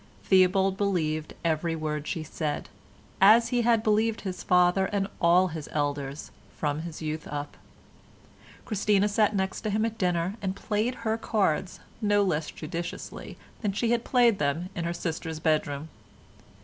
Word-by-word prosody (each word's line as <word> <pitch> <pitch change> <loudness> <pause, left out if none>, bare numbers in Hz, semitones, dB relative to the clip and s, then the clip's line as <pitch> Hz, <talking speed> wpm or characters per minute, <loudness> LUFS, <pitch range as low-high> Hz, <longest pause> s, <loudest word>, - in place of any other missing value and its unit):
Theobald 190 0 +4
believed 160 -6 -1
every 165 0 0
word 150 -1 -3
she 165 -3 -3
said, 150 -1 -4 0.5
as 220 +4 +7
he 245 -2 +1
had 230 -2 +3
believed 220 +1 +2
his 185 -2 -5
father 180 +1 +3
and 200 -1 -1
all 180 +2 +5
his 160 -2 -7
elders 145 -1 -2 0.3
from 150 -1 -1
his 165 -1 -7
youth 155 0 -4
up. 145 0 -5 1.1
Christina 205 -1 +2
sat 210 0 +2
next 190 +1 -2
him 215 0 +1
at 225 0 -4
dinner 180 +2 0
and 190 -1 -2
played 215 +5 -1
her 220 +1 0
cards 190 -6 0 0.2
no 205 -1 +3
less 160 -5 -1
judiciously 165 +2 -6 0.2
than 205 -3 -1
she 230 +3 0
had 240 -1 +1
played 240 -5 +3
them 150 +5 -1
in 170 - -3
her 170 - -1
sister's 160 -1 -4
bedroom. 155 -2 0
185 Hz, 150 wpm, -27 LUFS, 155-210 Hz, 1.1 s, as